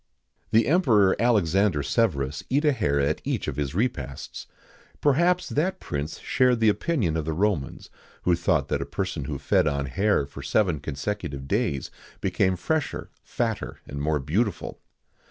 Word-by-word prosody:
The 115 0 +4
Emperor 115 - +4
Alexander 100 -7 +2
Severus 70 - 0
eat 145 +4 +2
a 150 - +5
hare 70 - +1
at 70 +3 0
each - - -2
of - - -3
his 75 0 -2
repasts.[XIX 80 - -3 0.5
98] - - -30
Perhaps 175 +6 +3
that 185 +6 0
prince 75 +1 -4
shared 125 -2 +2
the 110 -1 +5
opinion 105 - 0
of 80 -2 -1
the 80 - -1
Romans, 90 -5 -1 0.3
who 90 - +3
thought 85 0 +1
that 70 - 0
a - - -2
person 85 -1 -3
who 70 0 -3
fed 70 - +2
on 70 -1 0
hare 90 +3 +1
for 70 0 -10
seven 85 +2 +1
consectutive 70 -1 -4
days 70 0 -1 0.3
became 95 -1 +1
fresher, 150 - -2
fatter, 115 -3 -3
and 70 0 -6
more 75 +1 +1
beautiful. 85 - -1
90 Hz, 160 wpm, -25 LUFS, 70-115 Hz, 0.5 s, a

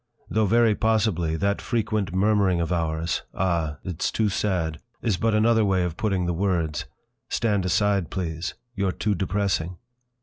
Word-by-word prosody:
Though 110 -1 +2
very 115 +1 +4
possibly 105 -7 +1
that 100 +4 0
frequent 110 -5 -1
murmuring 95 -1 +2
of 85 +1 -1
ours: 80 -1 -1
Ah! 85 -5 0
It's 90 -4 -2
too 110 -2 +1
sad! 90 -6 -1 0.2
is 110 -5 +2
but 110 +3 +1
another 110 +1 +4
way 95 -3 +2
of 85 -2 -2
putting 95 -2 0
the 85 - 0
words: 85 -4 0 0.4
Stand 105 -4 +1
aside, 95 -1 +2
please, 85 -3 -3 0.2
you're 100 -2 0
too 105 +3 -1
depressing! 95 -2 -1
95 Hz, 155 wpm, -25 LUFS, 85-105 Hz, 0.4 s, very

